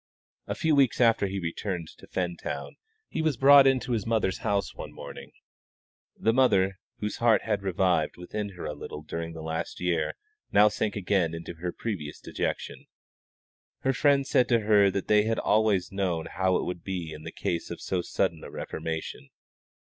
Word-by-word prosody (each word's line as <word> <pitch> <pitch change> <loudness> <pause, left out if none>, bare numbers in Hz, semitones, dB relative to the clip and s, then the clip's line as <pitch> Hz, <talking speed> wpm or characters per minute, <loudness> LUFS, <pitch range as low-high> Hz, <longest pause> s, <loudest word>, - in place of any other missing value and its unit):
A - - -2
few 160 -1 +1
weeks 135 -4 +3
after 115 -4 +4
he 95 - -5
had 95 - -3
returned 85 0 -3
to - - -14
Fentown 90 -2 -3 0.4
he 160 - -3
was 155 -5 +1
brought 140 +1 +8
into 130 -1 +1
his 115 -4 0
mother's 110 -5 +1
house 100 -1 -1
one - - -8
morning - - -9 0.9
dead - - -21
drunk. - - -9
The 115 - +5
mother, 100 -7 +3 0.2
whose 105 0 -3
heart 115 -2 +4
had 105 -2 -1
revived 90 -4 +1
within 100 +3 -5
her 90 - -7
a 75 - -3
little 75 +1 -8
during 85 +1 -5
the 80 -1 -8
last 80 +1 -4
year, 90 -1 0 0.4
now 105 +1 +6
sank 105 0 -2
again 90 -4 +1
into 85 +1 -7
her 85 +2 -4
previous 90 -11 -5
dejection. - - -4 0.9
Her 135 - +1
friends 140 0 +3
said 125 - +4
to 120 -2 +4
her 105 -2 +5
that 95 0 -3
they 105 0 +4
had 115 0 0
always 105 -3 +2
known 90 -4 -1
how 95 -1 0
it - - 0
would 90 -1 -5
be 90 -5 -4
in 75 - -9
the - - -7
case 85 -1 -3
of - - -6
so 95 -2 -1
sudden 85 -2 -1
a - - -8
reformation. 80 -3 -5
95 Hz, 190 wpm, -28 LUFS, 85-110 Hz, 0.9 s, brought